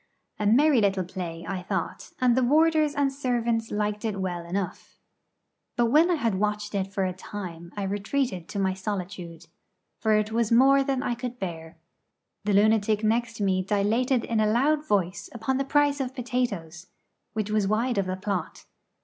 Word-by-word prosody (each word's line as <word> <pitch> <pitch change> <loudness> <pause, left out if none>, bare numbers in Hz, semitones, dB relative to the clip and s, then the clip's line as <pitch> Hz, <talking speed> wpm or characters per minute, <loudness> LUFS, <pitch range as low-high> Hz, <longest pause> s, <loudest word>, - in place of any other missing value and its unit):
A 210 - +1
merry 265 +3 +5
little 195 -2 +2
play, 170 -2 -6
I 190 -2 -3
thought, 180 - -4
and 250 -2 +4
the 260 - +3
warders 305 +3 +3
and 280 -1 +1
servants 235 -4 -1
liked 210 0 -2
it 210 -3 -2
well 175 -2 -3
enough. 185 0 -4 0.8
But 235 -1 +2
when 315 +5 +5
I 355 - +3
had 230 - 0
watched 210 0 -1
it 195 -1 -2
for 195 -1 0
a 185 - -2
time 175 -3 -8
I 200 - -2
retreated 200 -1 -2
to - - -5
my 190 -1 +1
solitude, 185 -4 -5 0.5
for 220 -1 +2
it 215 0 +1
was 230 -1 0
more 270 +3 +6
than 270 -2 -1
I 240 - 0
could 245 +1 -5
bear. 165 -4 -6 0.7
The 210 - +1
lunatic 215 +1 +3
next 230 0 0
me 190 -2 +2
dilated 225 +6 +1
in 230 -2 0
a 215 - +3
loud 295 +6 +2
voice 190 -3 0
upon 235 +3 -1
the 275 - -1
price 290 0 +2
of 260 -1 -3
potatoes, 205 - -3 0.5
which 215 -1 -2
was 210 -2 +2
wide 225 +2 +1
of 195 - -1
the 185 0 -2
plot. 190 -1 -4
215 Hz, 180 wpm, -26 LUFS, 190-250 Hz, 0.8 s, more